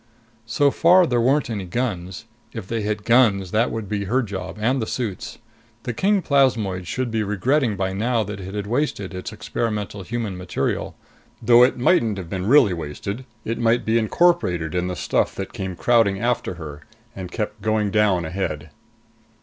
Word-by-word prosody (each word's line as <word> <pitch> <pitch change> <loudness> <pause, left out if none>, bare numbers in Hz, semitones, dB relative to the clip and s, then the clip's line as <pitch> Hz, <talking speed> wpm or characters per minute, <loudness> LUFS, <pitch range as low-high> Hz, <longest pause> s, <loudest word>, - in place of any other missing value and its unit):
So 140 +5 +2
far 180 +4 +5
there 120 -6 +1
weren't 140 +4 +2
any 100 -4 -3
guns. 95 -2 -3 0.3
If 115 -5 -6
they 115 0 -2
hit 105 0 -2
guns, 105 -6 +3
that 115 +3 +2
would 110 -2 -5
be 100 0 -2
her 130 +7 +1
job 95 -2 -6
and 125 +4 +1
the 110 - -3
suit's. 100 - -4 0.5
The 125 - -3
king 195 - +1
plasmoid 110 - +1
should 125 +5 -2
be 110 -1 0
regretting 110 +4 +1
by 95 0 -2
now 115 +3 0
that 105 0 -6
it 95 +1 -7
had 105 -1 -3
wasted 105 -5 -2
its 90 - -6
experimental 105 -3 -3
human 110 0 -4
material. 90 0 -3 0.4
Though 120 +1 +5
it 125 - +4
mightn't 120 - +2
have 90 -3 -7
been 95 0 -3
really 125 -6 +5
wasted; 90 - -5 0.2
it 115 +1 -3
might 120 +1 +2
be 115 +1 +2
incorporated 110 - +1
in 90 0 -1
the 90 - -3
stuff - - 0
that 95 - -6
came 95 -5 -5
crowding 110 -2 +2
after 120 -5 -1
her, 75 -3 -9 0.3
and 90 -2 -7
kept 105 -1 -4
going 110 -1 0
down 100 -5 +2
ahead. 80 -3 -4
105 Hz, 180 wpm, -22 LUFS, 95-120 Hz, 0.5 s, far